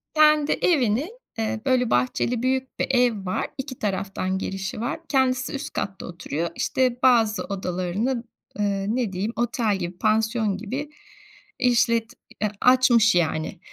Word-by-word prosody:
Kendi 305 -1 +5
evini, 270 - +2 0.3
ııı, 220 0 -1
böyle, 255 -3 +2
bahçeli, 125 - +1
büyük 260 0 -1
bir - - +1
ev 245 -6 +2
var. 185 - -1
2 265 -2 -6
taraftan 195 -2 -2
girişi 195 +2 -4
var. 255 +7 -2
Kendisi 260 -2 +1
üst 280 +2 -5
katta 195 -1 -4
oturuyor. 170 -1 -4
İşte, 255 -1 0
bazı 225 -4 +4
odalarını, 195 +6 -2 0.4
ııı, 200 +1 0
ne 240 -6 -1
diyeyim, 200 +5 -2
otel 230 -2 0
gibi, 175 -1 -5
pansiyon 220 -1 +1
gibi 255 +8 -5 0.7
işlet 235 -2 +2 0.3
ya, 210 -1 +1
açmış 250 -4 +5
yani. 160 -2 0
225 Hz, 135 wpm, -24 LUFS, 195-255 Hz, 0.7 s, Kendi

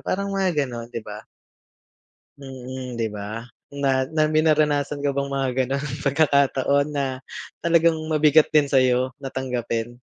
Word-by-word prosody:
parang 200 +1 -1
mga 180 -7 +1
gano'n, 120 -2 -7
'di 115 -2 -5
ba? 105 0 -8 1.1
Mm, 130 -2 -7
'di 115 -1 0
ba? 105 +2 -6 0.3
Na 135 -2 0
na 155 -1 +2
may 155 0 +3
naranasan 150 -2 +1
ka 145 - +1
bang 140 0 -2
mga 135 -1 -1 0.2
gano'n 140 +3 -2 0.2
pagkakataon 140 -1 +2
na 135 -2 -3 0.4
talagang 170 -1 +4 0.2
mabigat 155 0 +4
din 150 -2 +5
sa'yo 130 -1 +2
na 135 - -5
tanggapin? 120 -2 -3
140 Hz, 140 wpm, -23 LUFS, 125-150 Hz, 1.1 s, din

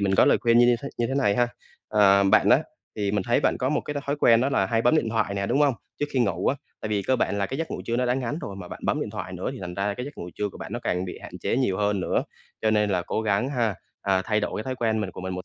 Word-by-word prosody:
mình 100 -1 +1
có - - +6
lời - - +4
khuyên 115 0 +4
như 120 - +7
như 120 0 +4
thế 140 - -4
như 120 - +1
thế 135 - -3
này 125 -8 +2
ha, 120 0 +3 0.4
à, 100 -2 +5
bạn 100 +2 +4
á - - +7 0.4
thì 100 -2 0
mình 105 -1 0
thấy 120 +5 +2
bạn - - +2
có 130 - 0
một 150 - +1
cái 150 - -6
th - - -1
thói 140 - 0
quen 115 -5 +5
đó 130 - +2
là 95 -8 +1
hay 115 +3 +1
bấm 160 - +4
điện 125 -7 +1
thoại 110 -3 0
nè, 100 0 -1
đúng 140 - +1
hông? 145 -3 +4 0.3
Trước 145 - +1
khi 135 - +1
ngủ 95 -6 0
á, - - +3 0.3
tại - - -4
vì 105 -2 0
cơ 130 +6 +1
bản 100 - 0
là 100 - 0
cái 135 - -5
giấc 165 - -3
ngủ - - -4
trưa 115 - -1
nó 125 0 +1
đã 125 - +2
ngắn 135 +3 -2
rồi 100 - -6
mà 90 -2 -8
bạn - - -8
bấm - - +1
điện - - -3
thoại - - -6
nữa - - -3
thì - - -8
thành 90 -2 -6
ra 100 +2 -1
cái 125 - -5
giấc 145 +2 -9
ngủ 90 - -6
trưa 105 - -2
của - - -12
bạn - - -7
nó - - -2
càng 90 +1 -1
bị 90 - -7
hạn - - -9
chế - - -1
nhiều 125 -8 +1
hơn 105 -1 +1
nữa, - - 0 0.4
cho 110 - +3
nên 105 -1 +2
là 90 -2 +1
cố 110 - -2
gắng 105 +4 +1
ha, 115 -6 0 0.3
à, 95 -1 +2
thay 105 +1 +1
đổi 105 0 -3
thói 130 +1 -3
quen 110 -3 0
mình 100 -3 -3
của - - -9
mình 95 0 -4
một 90 - -6
110 Hz, 340 wpm, -25 LUFS, 100-125 Hz, 0.4 s, như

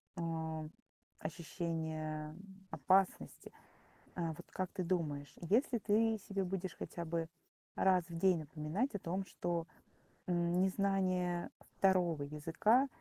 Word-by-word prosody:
а, 160 -2 -2 0.5
ощущения 160 -2 -3 0.3
опасности. 190 0 +2 0.6
Э, 170 -2 -1
вот - - -11
как 185 -1 -3
ты 185 - -2
думаешь, 155 -6 -1
если 235 - +3
ты 220 +1 +3
себе 195 -1 0
будешь 185 -1 -2
хотя 170 - -5
бы 165 0 -1 0.5
раз 185 -2 +4
в 170 - -6
день 185 0 +4
напоминать 155 - -2
о - - -2
том, 185 +2 -2
что, 170 -2 -2 0.6
м, 175 0 +2
незнание 185 -2 +1 0.3
2 180 -5 +3
языка- 165 - +3
175 Hz, 115 wpm, -36 LUFS, 160-190 Hz, 0.6 s, раз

